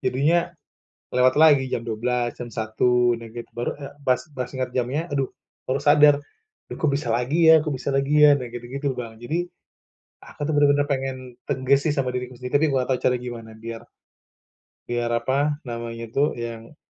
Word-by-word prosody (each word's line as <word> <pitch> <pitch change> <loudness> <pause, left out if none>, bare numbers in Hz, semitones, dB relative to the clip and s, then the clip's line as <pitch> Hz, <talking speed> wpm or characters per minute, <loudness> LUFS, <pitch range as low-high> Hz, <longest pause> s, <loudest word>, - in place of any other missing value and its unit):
Jadinya 145 +7 +2 0.8
lewat 130 +1 +4
lagi 145 -4 +5
jam 115 - -2
12.00, 120 +2 -1
jam 120 -1 -7
1.00, 120 +2 +2
nah 115 - -9
gitu. 120 0 -8
Baru, 120 +3 -3
eee, 140 -1 -9
pas 125 -1 +2
pas 125 -1 -3
ingat 130 -2 -4
jamnya 130 +6 0
aduh 135 -2 0 0.4
baru 135 +2 0
sadar. 145 0 +6 0.6
"Duh - - -6
kok 155 - +2
bisa 130 -5 -4
lagi 150 +8 +3
ya 160 - +7
kok 155 - -3
bisa 130 +2 -3
lagi 145 +2 +4
ya?" 145 - +8
Nah, 125 -2 -6
gitu-gitu, 130 +4 -4
Bang. 115 -2 -7
Jadi 165 +9 -2 0.8
aku - - -16
tuh - - 0
bener-bener 145 0 +4
pengen 135 -1 -1 0.3
tegas 135 +2 +2
sih 145 - +2
sama 130 -3 0
diriku 125 0 -5
sendiri, 125 +2 -8
tapi 160 - +3
aku 135 - 0
nggak 125 - -1
tau 125 - +1
caranya 125 -1 +1
gimana 115 -2 -8
biar 115 0 -7 1.1
biar 120 0 -1
apa 140 +5 0
namanya 115 -1 -5
tuh 145 +4 +1
yang 115 +2 -7
130 Hz, 185 wpm, -23 LUFS, 120-145 Hz, 1.1 s, ya